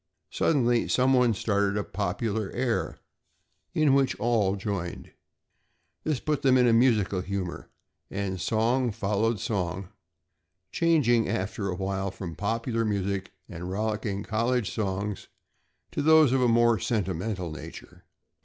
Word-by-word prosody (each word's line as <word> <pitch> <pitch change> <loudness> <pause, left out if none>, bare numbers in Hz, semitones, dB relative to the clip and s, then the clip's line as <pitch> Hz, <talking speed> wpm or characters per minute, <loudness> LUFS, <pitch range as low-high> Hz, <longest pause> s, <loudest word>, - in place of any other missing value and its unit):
Suddenly, 120 -6 +2
someone 125 -3 +3
started 100 0 0
a 105 - 0
popular 105 +2 -2
air 120 -2 -1 0.8
in 150 -3 +4
which 135 -1 +2
all 105 -4 +2
joined. 95 -3 -4 0.9
This 155 -5 -1
put 150 +1 -1
them 130 -1 +4
in 125 - +4
a 115 - +4
musical 110 -6 +3
humor, 95 -2 -5 0.4
and 95 -2 -3
song 120 +4 +1
followed 105 +1 0
song, 90 -2 -3 0.8
changing 135 -9 +3
after 100 +1 -2
a 90 - -2
while 95 +1 -2
from 90 -2 -7
popular 115 +3 -1
music 100 -2 -2 0.2
and 90 0 -7
rollicking 105 0 -2
college 115 0 0
songs 100 -1 -3 0.6
to - - -2
those 155 -2 +6
of 130 0 +2
a 125 - +4
more 115 -1 +4
sentimental 95 -3 -2
nature. 75 -4 -10
110 Hz, 125 wpm, -27 LUFS, 95-120 Hz, 0.9 s, those